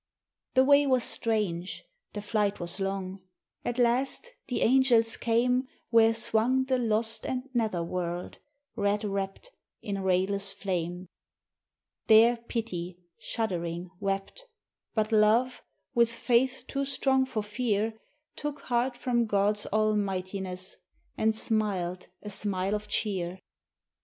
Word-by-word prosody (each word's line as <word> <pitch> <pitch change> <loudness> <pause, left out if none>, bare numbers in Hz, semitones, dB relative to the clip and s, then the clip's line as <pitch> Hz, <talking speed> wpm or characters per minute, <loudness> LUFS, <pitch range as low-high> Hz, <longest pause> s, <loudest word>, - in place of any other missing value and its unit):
The 260 - +6
way 285 +1 +5
was 255 -3 +3
strange, 200 -6 -1 0.3
the 205 - -5
flight 205 -1 0
was 175 +3 -2
long; 195 -1 -3 0.4
at 240 - -3
last 255 - +2
the 250 - 0
angels 235 -2 +4
came 250 +3 +1 0.2
Where 225 -1 +5
swung 230 +3 +2
the 260 -1 +1
lost 225 -1 0
and 255 +1 -3
nether 220 -8 0
world, 175 0 -4 0.4
red 205 +1 0
wrapped 195 - -4 0.3
in 200 -1 -4
rayless 195 +1 +1
flame. 180 -2 -3 1.0
There 225 +2 +7
Pity, 215 -7 -5 0.2
shuddering, 175 -5 -3
wept; 195 - -3 0.5
but 215 0 +1
Love, 225 +4 +3 0.3
with 235 -2 +3
faith 245 +2 +1
too 275 0 -2
strong 270 -1 +2
for 225 -5 -3
fear, 215 0 -1 0.4
Took 295 -1 -4
heart 245 +1 0
from 240 -2 0
God's 205 0 +1
almightiness 195 -3 -1 0.4
and 220 0 +1
smiled 195 -5 -1 0.2
a 210 - -5
smile 195 -1 0
of 210 0 -3
cheer. 190 -4 -1
215 Hz, 120 wpm, -28 LUFS, 195-240 Hz, 1.0 s, There